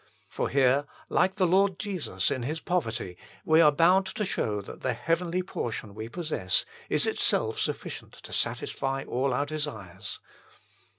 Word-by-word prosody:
For - - -2
here, 135 +1 +4 0.2
like 190 +1 +3
the 190 -3 +3
Lord 190 +1 +3
Jesus 200 -5 -1
in 130 - -1
His 150 +7 -2
poverty, 115 - -2 0.3
we 160 +1 +6
are 150 -2 +7
bound 180 +6 +4
to 210 +2 -2
show 105 - -1
that 100 - -9
the 130 - 0
heavenly 170 +7 0
portion 115 - -4
we 110 +2 -6
possess 150 - 0 0.2
is - - +3
itself - - +1
sufficient - - -3
to - - -11
satisfy 135 0 -1
all 130 +2 0
our 135 +3 +1
desires. 145 -12 -5
150 Hz, 155 wpm, -28 LUFS, 120-180 Hz, 0.3 s, are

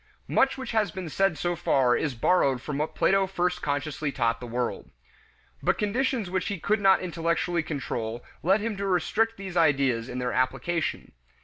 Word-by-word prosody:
Much 270 0 +2
which 260 - -5
has 220 -3 +2
been 180 +1 -6
said 195 0 +1
so 175 0 -1
far 130 -7 +2
is 145 -5 -1
borrowed 135 0 +2
from 140 +2 -4
what 150 - -2
Plato 195 0 +3
first 180 -1 -1
consciously 145 +1 -2
taught 115 -3 0
the 125 - -7
world. 120 +1 -3 0.7
But - - +1
conditions 235 +1 0
which 185 +1 -2
he 200 -3 -3
could 210 +5 +1
not 195 -1 +5
intellectually 170 0 0
control 120 -7 -4 0.2
led 190 +5 +3
him 225 0 -2
to 200 0 -2
restrict 215 +5 +1
these 190 -2 -7
ideas 135 -8 +2
in - - -5
their 125 -1 -2
application. 135 +6 -1
170 Hz, 180 wpm, -27 LUFS, 135-195 Hz, 0.7 s, not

